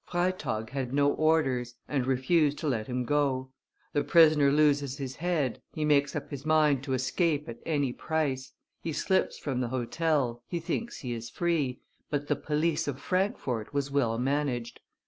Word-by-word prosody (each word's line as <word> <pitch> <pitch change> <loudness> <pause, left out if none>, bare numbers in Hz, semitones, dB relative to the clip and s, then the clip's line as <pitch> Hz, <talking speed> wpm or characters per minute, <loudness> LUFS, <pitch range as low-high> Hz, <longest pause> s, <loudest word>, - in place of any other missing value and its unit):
Freytag 175 -11 -2
had 130 -2 -3
no 145 0 +4
orders, 135 -7 +1
and 135 -4 -1
refused 145 +3 +2
to 155 - -3
let 115 -6 -1
him 125 0 -2
go; 130 -1 0 0.4
the 145 - +2
prisoner 155 -2 +6
loses 145 -2 +2
his 135 -2 -5
head, 160 -6 -1
he 155 - -1
makes 140 -2 +3
up - - -5
his 140 -1 -6
mind 150 -3 +3
to 135 - -2
escape 145 +4 0
at 120 0 -7
any 145 -5 +1
price, 140 -5 -2 0.3
he 160 - -3
slips 190 +5 +1
from 130 -4 -2
the 125 - 0
hotel, 130 0 0
he 175 - -2
thinks 230 +8 -4
he 125 -3 -3
is 115 0 -6
free, 155 -7 -1 0.3
but 145 -1 -1
the 145 - +2
police 150 +2 0
of 140 -2 -3
Frankfort 145 - -1
was 140 -1 -1
well 120 -5 +1
managed. 130 -2 -1
140 Hz, 170 wpm, -29 LUFS, 130-155 Hz, 0.4 s, prisoner